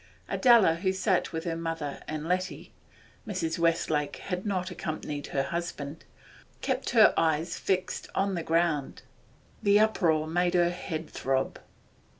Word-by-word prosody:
Adela, 230 Hz, -, +5 dB
who 185 Hz, +2 st, +1 dB
sat 190 Hz, 0 st, +1 dB
with 160 Hz, -1 st, -4 dB
her 170 Hz, -2 st, -2 dB
mother 165 Hz, -3 st, -4 dB
and 155 Hz, +1 st, -4 dB
Letty 185 Hz, +1 st, -2 dB, 0.5 s
(Mrs. 170 Hz, -5 st, -2 dB
Westlake 160 Hz, -3 st, +1 dB
had 180 Hz, +1 st, -4 dB
not 185 Hz, -2 st, -1 dB
accompanied 150 Hz, -2 st, -5 dB
her 135 Hz, -, 0 dB
husband), 150 Hz, -1 st, -5 dB, 0.6 s
kept 265 Hz, 0 st, -1 dB
her 225 Hz, -3 st, +6 dB
eyes 160 Hz, +1 st, +1 dB
fixed 185 Hz, -1 st, -2 dB
on 195 Hz, 0 st, +1 dB
the 170 Hz, -, -2 dB
ground; 165 Hz, -3 st, 0 dB, 0.6 s
the 205 Hz, -1 st, +5 dB
uproar 170 Hz, -8 st, +2 dB
made 175 Hz, +2 st, +1 dB
her 175 Hz, -1 st, +4 dB
head 165 Hz, -3 st, -5 dB
throb. 135 Hz, 0 st, -1 dB
170 Hz, 140 wpm, -28 LUFS, 155-185 Hz, 0.6 s, her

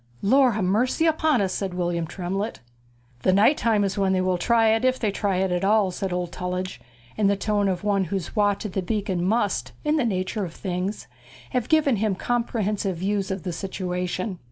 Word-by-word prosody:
'Lord 255 Hz, +1 st, +4 dB
ha' 210 Hz, -, -1 dB
mercy 235 Hz, -, +1 dB
upon 315 Hz, -5 st, +2 dB
us!' 190 Hz, -2 st, 0 dB
said 190 Hz, -3 st, -3 dB
William 175 Hz, -2 st, -1 dB
Tremlett. 195 Hz, +5 st, -3 dB, 0.6 s
'The 185 Hz, -, +3 dB
night 210 Hz, +10 st, +5 dB
time 220 Hz, -5 st, +2 dB
is 195 Hz, 0 st, -1 dB
when 190 Hz, -1 st, +2 dB
they 185 Hz, -, +2 dB
will 185 Hz, -1 st, 0 dB
try 225 Hz, +3 st, +3 dB
it, 225 Hz, +2 st, +2 dB
if 255 Hz, 0 st, +3 dB
they 215 Hz, -5 st, 0 dB
try 195 Hz, -1 st, -1 dB
it 190 Hz, 0 st, 0 dB
at 180 Hz, +1 st, 0 dB
all,' 205 Hz, -1 st, +3 dB
said 190 Hz, +1 st, -3 dB
old 180 Hz, -1 st, -2 dB
Tullidge, 180 Hz, -6 st, -4 dB, 0.4 s
in 210 Hz, -2 st, +3 dB
the 200 Hz, -, +3 dB
tone 205 Hz, 0 st, 0 dB
of 185 Hz, 0 st, -2 dB
one 200 Hz, -2 st, +1 dB
whose 185 Hz, +2 st, -4 dB
watch 205 Hz, -1 st, +1 dB
at 200 Hz, -, -5 dB
the 190 Hz, -, 0 dB
beacon 190 Hz, -2 st, -1 dB
must, 205 Hz, +1 st, 0 dB
in 300 Hz, +1 st, +2 dB
the 295 Hz, -, +2 dB
nature 200 Hz, -1 st, -1 dB
of 170 Hz, -3 st, -6 dB
things, 185 Hz, +2 st, -3 dB, 0.5 s
have 250 Hz, -2 st, -1 dB
given 295 Hz, -6 st, +3 dB
him 210 Hz, -1 st, 0 dB
comprehensive 210 Hz, -4 st, -1 dB
views 195 Hz, +2 st, -1 dB
of 190 Hz, -2 st, -3 dB
the 180 Hz, -2 st, -3 dB
situation. 180 Hz, +1 st, -3 dB
195 Hz, 205 wpm, -24 LUFS, 185-220 Hz, 0.6 s, night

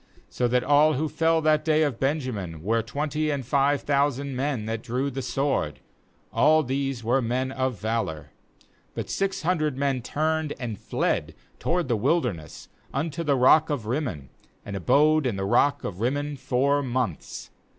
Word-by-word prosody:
46So 125 Hz, -, 0 dB
that 125 Hz, 0 st, +2 dB
all 150 Hz, +3 st, +5 dB
who 155 Hz, +4 st, 0 dB
fell 165 Hz, +1 st, +2 dB
that 155 Hz, -1 st, +3 dB
day 155 Hz, -1 st, +3 dB
of 140 Hz, -6 st, -1 dB
Benjamin 120 Hz, -, -2 dB
were 115 Hz, +4 st, +1 dB
twenty 150 Hz, +6 st, -2 dB
and 140 Hz, -4 st, -2 dB
five 140 Hz, +2 st, +2 dB
thousand 140 Hz, -1 st, 0 dB
men 130 Hz, -4 st, -1 dB
that 110 Hz, 0 st, -3 dB
drew 130 Hz, +4 st, -2 dB
the 135 Hz, +1 st, -4 dB
sword; 125 Hz, -, -1 dB, 0.5 s
all 155 Hz, 0 st, +4 dB
these 135 Hz, -2 st, -2 dB
were 125 Hz, +4 st, +2 dB
men 130 Hz, +3 st, -1 dB
of 130 Hz, -5 st, -2 dB
valour. 110 Hz, -8 st, -3 dB, 0.7 s
47But -, -, -4 dB
six 195 Hz, 0 st, -1 dB
hundred 155 Hz, -5 st, 0 dB
men 135 Hz, -2 st, 0 dB
turned 155 Hz, +3 st, -1 dB
and 115 Hz, -5 st, -5 dB
fled -, -, -1 dB, 0.2 s
toward 175 Hz, -2 st, 0 dB
the 120 Hz, -, +1 dB
wilderness 105 Hz, -, -1 dB, 0.2 s
unto 155 Hz, +4 st, -2 dB
the 145 Hz, -3 st, +2 dB
rock 150 Hz, +5 st, +5 dB
of 140 Hz, -7 st, -2 dB
Rimmon, 115 Hz, -, -3 dB, 0.4 s
and 100 Hz, -, -5 dB
abode 150 Hz, -, +3 dB
in 115 Hz, -, -1 dB
the 95 Hz, 0 st, -2 dB
rock 145 Hz, +8 st, +2 dB
of 90 Hz, -2 st, -5 dB
Rimmon 145 Hz, +4 st, -1 dB
four 140 Hz, +2 st, +1 dB
months. 125 Hz, -, -3 dB
135 Hz, 165 wpm, -25 LUFS, 120-150 Hz, 0.7 s, all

